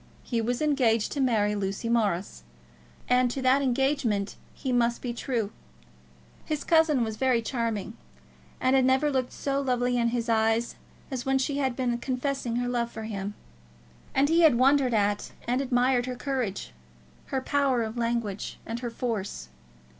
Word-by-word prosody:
He 235 -2 -1
was 245 +5 -1
engaged 245 -7 +2
to 285 - -1
marry 215 -5 +2
Lucy 200 +2 -3
Morris, 205 - 0 0.7
and 250 0 +3
to 255 - -4
that 260 +2 +4
engagement 255 -6 0 0.2
he 265 - -4
must 240 -1 +2
be 245 -2 -4
true. 235 -4 -2 0.9
His 305 -2 -3
cousin 320 -6 +4
was 220 -1 -4
very 255 -2 +2
charming, 225 -3 -2 0.6
and 255 +1 +3
had 265 - +4
never 265 +3 +3
looked 260 -2 -1
so 275 0 -1
lovely 250 -2 +1
in 235 - +2
his 235 0 -1
eyes 225 +1 +2 0.4
as 255 -2 -3
when 270 +1 +2
she 275 +2 -1
had 265 -3 0
been 245 -2 -1
confessing 255 -1 -2
her 245 0 0
love 240 -1 -1
for 220 - -7
him. 205 -2 -4 0.8
And 275 +1 +4
he 330 +3 +4
had 315 -7 +6
wondered 260 -1 +4
at 205 -1 0
and 250 +2 +1
admired 250 -1 +2
her 250 - -3
courage, 245 - -3 0.5
her 265 - -1
power 265 -2 +1
of 220 +1 -5
language, 230 -4 -2
and 230 +1 -4
her 240 -1 -3
force. 220 - -4
245 Hz, 165 wpm, -27 LUFS, 225-265 Hz, 0.9 s, had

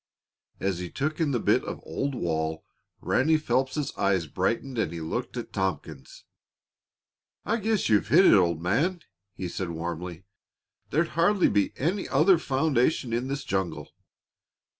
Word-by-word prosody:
As 95 -2 -1
he 90 -1 -5
took 155 - -3
in 160 -3 +2
the 125 -4 0
bit - - +2
of - - -6
old 135 - -3
wall 80 -4 -2 0.4
Ranny 155 +4 +2
Phelps' 135 +1 -1
eyes 95 -4 +1
brightened 115 - -2
and 95 - 0
he 85 - -5
looked 80 0 -4
at - - -6
Tompkins. 80 -7 -4 1.2
"I 225 - +1
guess 220 -3 0
you've 105 -2 +3
hit 170 - +6
it, - - +7
old 85 -4 +3
man," 160 - +1 0.3
he 95 - -4
said 90 +1 -4
warmly. 85 +1 -5 0.7
"There'd 160 +3 +1
hardly 180 +4 +3
be 100 -1 +1
any 180 +8 -1
other 180 +1 +4
foundation 135 -4 +1
in 120 +2 -1
this 140 +1 -3
jungle. 95 -2 -3
120 Hz, 150 wpm, -27 LUFS, -, 1.2 s, it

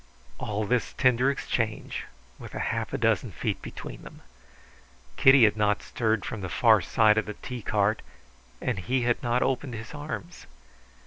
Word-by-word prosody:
All 105 +1 -2
this 125 +3 0
tender 125 0 +3
exchange 115 -5 -2 0.3
with - - -10
half - - -2
a - - -1
dozen - - +1
feet - - -3
between - - -8
them. - - -13 0.9
Kitty 135 -1 +7
had 105 -1 +5
not 105 -1 +1
stirred 110 -4 -1
from 110 - -5
the 95 - -4
far 110 +2 +4
side 110 +2 +4
of 110 - -4
the 105 - -5
tea 125 -2 -7
cart, 105 +1 +1 0.6
and 120 -6 -2
he 125 +7 0
had 120 0 +1
not 120 0 +1
opened 130 -1 -1
his 115 +4 -8
arms. 155 +4 -7
115 Hz, 165 wpm, -27 LUFS, 105-125 Hz, 0.9 s, Kitty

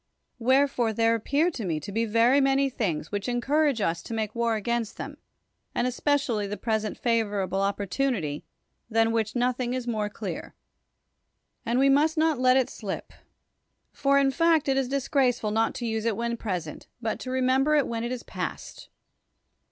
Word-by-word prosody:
Wherefore 255 -2 +2
there 225 +1 +3
appear 285 +9 +1
to 240 - -6
me 165 -5 -1
to 155 - -8
be 225 +3 0
very 230 +5 +4
manj^ 270 0 +2
things 165 - -2
which 205 +3 -2
encourage 270 +1 +1
us 170 -3 0
to 230 - -6
make 215 -1 -2
war 235 -1 +1
against 230 +1 -2
them, - - -7 0.6
and 240 - +1
especially 250 -4 0
the 205 +1 -4
present 220 0 -2
favorable 205 -5 0
oppor 200 +1 0
tunity, 185 - -1 0.5
than 225 0 +3
w^hich 225 0 -1
nothing 250 0 0
is 255 -2 -3
more 215 -3 -1
clear. - - -6 1.1
And 235 +2 +1
we 270 +1 +4
must 300 +4 +3
not 315 -3 +2
let 255 0 +5
it 260 - +2
slip. 200 -4 -6 0.8
For, 280 0 +2
in 275 -1 +3
fact, 330 0 +3
it 270 - +2
is 270 -1 +1
dis 275 -1 -1
graceful 250 -6 +1
not 225 +1 +1
to 240 - -4
use 220 -1 -2
it 225 -3 0
when 235 0 -1
present, 180 -9 -5
but 225 -2 -2
to 255 - -6
remember 260 +3 +2
it 290 - +3
when 230 -1 -3
it 240 - -3
is 250 -2 -4
past. - - -6
235 Hz, 180 wpm, -26 LUFS, 215-270 Hz, 1.1 s, let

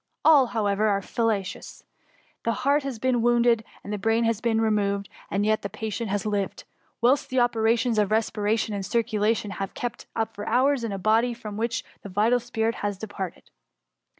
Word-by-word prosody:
All, 290 -5 +7
however, 215 -2 +1
are 200 -2 +1
fallacious; 215 -5 -2 0.6
the 230 - +1
heart 285 +2 +4
has 270 -4 -4
been 245 +1 +1
wounded, 235 -1 +3 0.2
and 205 - -5
the 210 - -3
brain 225 +3 +2
has 225 -1 0
been 230 -2 +1
removed, 200 -2 +1 0.2
and 200 +1 0
yet 215 0 +2
the 200 - -4
patient 220 +1 -4
has 205 +1 -1
lived, 205 -2 -2 0.4
whilst 255 +4 +3
the 260 - +1
operations 230 -1 +2
of 205 -2 +2
respiration 215 0 0
and 200 -1 -3
circulation 220 -1 0
have 195 0 -5
been - - -9
kept 245 -2 -4
up 225 0 -1
for 205 - -7
hours, 265 0 +2
in 230 - -2
a 195 - -3
body 225 +5 +2
from 215 -3 -7
which 230 +2 -2 0.2
the 200 - -8
vital 215 +6 +3
spirit 225 -1 -1
had 205 -1 -2
departed. 195 -3 -7
220 Hz, 185 wpm, -25 LUFS, 205-235 Hz, 0.6 s, All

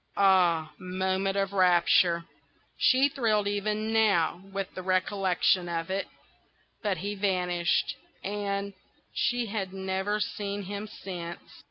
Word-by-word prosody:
Ah, 175 -5 +4
moment 190 +1 -1
of 195 0 0
rapture! 175 -2 +4 0.5
She 260 +2 +4
thrilled 220 -7 +1
even 210 +2 -1
now 200 -6 +3
with 195 -1 -4
the 185 - -6
recollection 185 -1 +1
of 165 +1 -3
it. 195 +1 -1 0.7
But 205 -4 0
he 205 +2 -3
vanished, 180 -7 0 0.3
and—she 200 +4 -3
had 200 -3 -4
never 190 +2 -1
seen 205 -1 -3
him 200 +2 -5
since. 175 -4 -7
195 Hz, 115 wpm, -28 LUFS, 180-205 Hz, 0.7 s, Ah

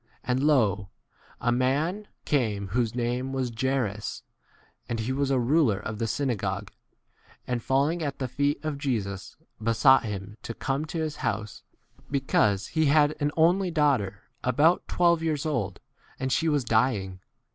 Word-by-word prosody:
And 130 0 0
lo, 105 -10 +2 0.5
a 120 - +1
man 150 +12 0 0.2
came 105 -9 0
whose 115 +2 0
name 125 +2 -1
was 130 -2 -1
Jairus, 120 -4 -2 0.7
and 115 - -2
he 110 +3 -2
[was] 140 0 0
a 135 - +2
ruler 125 -3 +3
of 105 +1 -6
the 115 - 0
syna 130 +2 0
gogue, 100 0 -3 0.8
and 125 -1 -2
falling 140 +8 +1
at 140 -3 -3
the 130 - -2
feet 145 +3 -1
of 150 -2 -2
Jesus 105 -9 -3 0.3
besought 115 +4 +5
him 105 0 -6
to 115 - -6
come 135 +3 -2
42 160 - -5
to 160 - 0
his 155 -2 -3
house, 105 +1 -3 0.5
because 105 -8 +1
he 160 -2 +2
had 150 +1 +4
an 145 -1 +1
only 180 +4 +4
daughter, 130 - +1 0.2
about 145 +8 +3
twelve 170 -2 +3
years 155 -3 -1
old, 110 - -2 0.4
and 130 0 -2
she* 165 +4 +2
was 145 -3 +1
dying. 110 -5 +1
130 Hz, 160 wpm, -27 LUFS, 110-145 Hz, 0.8 s, besought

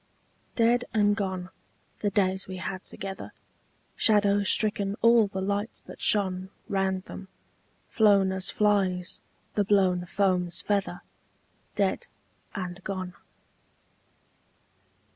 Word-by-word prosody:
DEAD 240 +1 +3
and 205 -1 +3
gone, 190 -3 -3 0.5
the 205 - 0
days 190 -2 0
we 185 -1 -6
had 185 0 -5
together, 195 0 -7 0.6
Shadow 205 -2 +4
stricken 200 0 +2
all 230 -2 +6
the 190 -1 -5
lights 200 +3 -3
that - - -12
shone 190 -2 +2 0.2
Round 190 -1 -1
them, 190 - -10 0.6
flown 200 -3 +3
as 190 0 +1
flies 195 -4 0 0.3
the 205 - +1
blown 185 -3 +2
foam's 180 -3 +1
feather, 200 -3 -2 0.7
Dead - - 0 0.5
and 180 -1 -5
gone. 185 -2 -4
195 Hz, 105 wpm, -27 LUFS, 185-205 Hz, 0.7 s, all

